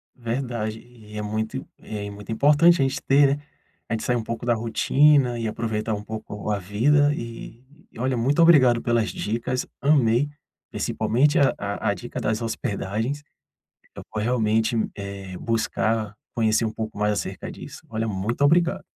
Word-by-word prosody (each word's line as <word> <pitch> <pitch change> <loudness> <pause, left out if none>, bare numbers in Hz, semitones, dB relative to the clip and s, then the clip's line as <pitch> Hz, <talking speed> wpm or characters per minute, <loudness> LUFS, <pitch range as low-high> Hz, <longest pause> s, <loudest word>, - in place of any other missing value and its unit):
Verdade 115 -3 -3
e 110 -3 -13
é - - -2
muito 110 +5 -3
é 105 -1 -6
muito 100 +1 -9
importante 150 +8 +5
a - - +5
gente 135 +1 -1
ter, 140 0 +4
né, 145 - -16 0.5
a - - -1
gente 110 - -2
sair 120 -2 0
pouco 115 +1 -5
da 120 - +3
rotina 125 +3 +3
e 115 - -2
aproveitar 110 0 -2
um 105 - -7
pouco 105 -1 -5
a 105 - 0
vida 140 +10 +3
e 115 -1 -8 0.3
e - - -10
olha, 130 0 0
muito 140 +8 +2
obrigado 130 -8 +6
pelas 115 -2 +1
dicas, 120 +4 -2 0.2
amei, 140 -2 +3 0.4
principalmente 140 +6 +1
a 140 - +4
a 100 0 -2
a - - +2
dica 120 +6 -7
das 110 -1 -1
hospedagens, 115 +4 -3 0.7
eu - - -8
vou 105 -1 -2
realmente, 115 0 +1 0.2
eh, 100 -2 -7
buscar, 110 -1 -1 0.2
conhecer 110 0 +2
um 110 - -2
pouco 110 -1 -5
mais 105 0 +2
acerca - - -4
disso, - - -10
olha, 115 0 -2
muito 105 +6 -2
obrigado. 170 +4 +3
115 Hz, 165 wpm, -24 LUFS, 110-130 Hz, 0.7 s, obrigado